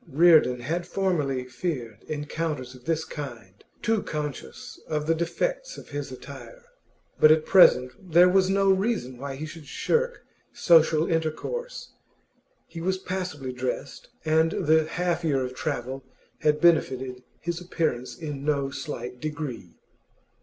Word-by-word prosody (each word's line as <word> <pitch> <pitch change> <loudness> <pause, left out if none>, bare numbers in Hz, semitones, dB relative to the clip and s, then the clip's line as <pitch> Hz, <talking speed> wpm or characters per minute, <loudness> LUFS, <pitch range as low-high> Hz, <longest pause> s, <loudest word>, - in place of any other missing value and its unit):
Reardon 155 -5 +5
had 170 +7 -2
formerly 150 -10 0
feared 125 - -5
encounters 150 -3 -3
of 125 -1 -16
this 160 0 0
kind, 120 -11 -8 0.2
too 225 -2 +2
conscious 150 -4 -6
of 150 -1 -1
the 165 - +3
defects - - -2
of - - -11
his 145 -1 -5
attire; 130 -2 -10 0.6
but 155 - +8
at 155 0 +4
present 165 -1 +5
there 175 +3 +7
was 185 0 +3
no 195 0 +4
reason 190 - -1
why 140 0 -5
he 150 +3 -5
should 155 -1 -10
shirk - - 0 0.3
social 160 -2 +4
intercourse. 165 - -3 0.7
He 165 - -8
was 185 +2 0
passably 180 -9 -4
dressed, 130 +2 -4 0.2
and 160 +1 +3
the 160 +1 +4
half 175 0 -1
year 140 -5 +1
of 125 0 -4
travel 135 -1 -4 0.4
had 150 0 +2
benefited 130 -6 +2 0.2
his 170 +1 -3
appearance 160 -8 -2
in 145 -4 -6
no 140 -2 0
slight 125 -5 -6
degree. 150 -3 -5
155 Hz, 140 wpm, -26 LUFS, 135-175 Hz, 0.7 s, but